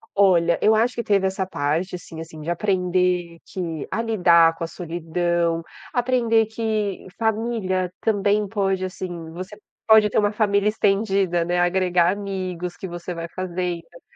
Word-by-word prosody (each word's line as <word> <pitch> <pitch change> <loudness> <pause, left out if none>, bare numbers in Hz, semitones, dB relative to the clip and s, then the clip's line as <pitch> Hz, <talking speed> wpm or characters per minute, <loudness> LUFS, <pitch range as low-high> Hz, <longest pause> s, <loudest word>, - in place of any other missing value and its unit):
Olha, 175 -4 +4
eu 220 - +5
acho 235 +3 +2
que 235 - -2
teve 200 -2 +2
essa 190 0 -1
parte, 165 +3 -1
assim 165 -2 -9
assim, 160 -1 -10
de 160 - -5
aprender 180 -2 0
que 165 -5 -4
a - - -1
lidar 170 -7 +4
com 165 - -6
a - - -2
solidão, 170 0 -1 0.3
aprender 240 -3 +2
que 215 -3 -2
família 215 -5 -1
também 205 -1 +1
pode, 195 -2 0
assim, 175 -3 -6
você 185 +4 -8 0.3
pode 220 -1 +6
ter - - +3
uma 205 0 +2
família 205 -1 +2
estendida, 195 -4 +1
né, 175 +1 0
agregar 175 -1 +3
amigos 185 -3 -4
que 190 - -6
você 175 +1 -6
vai 170 0 -5
fazendo. 180 -2 -3
Então, 170 - -17
185 Hz, 155 wpm, -23 LUFS, 170-205 Hz, 0.3 s, pode